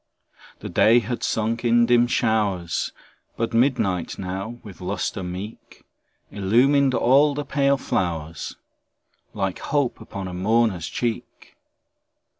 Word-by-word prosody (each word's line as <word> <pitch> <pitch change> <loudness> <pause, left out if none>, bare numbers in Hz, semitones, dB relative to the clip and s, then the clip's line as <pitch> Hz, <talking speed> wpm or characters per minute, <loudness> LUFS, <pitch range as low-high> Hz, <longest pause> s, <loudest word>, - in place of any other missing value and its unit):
The - - -6
day 115 +3 +5
had 120 +1 -1
sunk 115 +2 -1
in 120 0 +4
dim 120 0 +4
showers, 105 -8 0 0.5
But 115 0 -2
midnight 115 - +1
now, 95 +5 -5
with 100 -5 -12
lustre 95 +1 -3
meet. 95 +4 -8 0.5
Illumined 130 +7 +3
all 140 +5 +4
the 145 0 -3
pale 140 -1 +2
flowers, 85 - -3 0.8
Like 95 -3 -2
hope 140 -5 -1
upon 100 -3 -6
a 90 - -6
mourner's 100 -2 +1
cheek. 115 +6 -4
110 Hz, 115 wpm, -23 LUFS, 95-120 Hz, 0.8 s, day